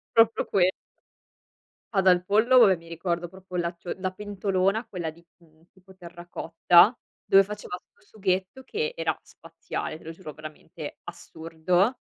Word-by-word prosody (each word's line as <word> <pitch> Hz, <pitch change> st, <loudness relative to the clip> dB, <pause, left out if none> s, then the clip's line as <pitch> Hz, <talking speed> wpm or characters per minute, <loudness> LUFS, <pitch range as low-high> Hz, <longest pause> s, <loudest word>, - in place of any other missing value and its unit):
Proprio 225 Hz, 0 st, +4 dB
que 185 Hz, -2 st, +3 dB, 1.2 s
Ma 195 Hz, -, +3 dB
dal 180 Hz, -1 st, +4 dB
pollo, 220 Hz, +7 st, +4 dB
vabbè 200 Hz, -6 st, +7 dB
mi 165 Hz, 0 st, -17 dB
ricordo 170 Hz, +1 st, -3 dB
proprio 185 Hz, +1 st, -12 dB
la 170 Hz, -1 st, 0 dB
tu 175 Hz, 0 st, -12 dB
ehm, -, -, -4 dB
la 185 Hz, 0 st, -2 dB
pentolona 195 Hz, +2 st, -1 dB
quella 180 Hz, -7 st, -4 dB
di, 170 Hz, +2 st, -15 dB
mhmm, 165 Hz, 0 st, -26 dB
tipo 190 Hz, 0 st, -20 dB
terracotta 175 Hz, +3 st, +3 dB, 0.3 s
dove 195 Hz, 0 st, +6 dB
faceva 205 Hz, -2 st, -6 dB
questo 210 Hz, -, -23 dB
sughetto 190 Hz, +6 st, -1 dB
che 460 Hz, -, -3 dB
era -, -, -1 dB
spaziale, -, -, -7 dB
te -, -, -18 dB
lo 160 Hz, -, -7 dB
giuro 165 Hz, -2 st, -10 dB
veramente, 155 Hz, +1 st, -9 dB
assurdo; 175 Hz, +6 st, -1 dB
185 Hz, 155 wpm, -26 LUFS, 170-200 Hz, 1.2 s, vabbè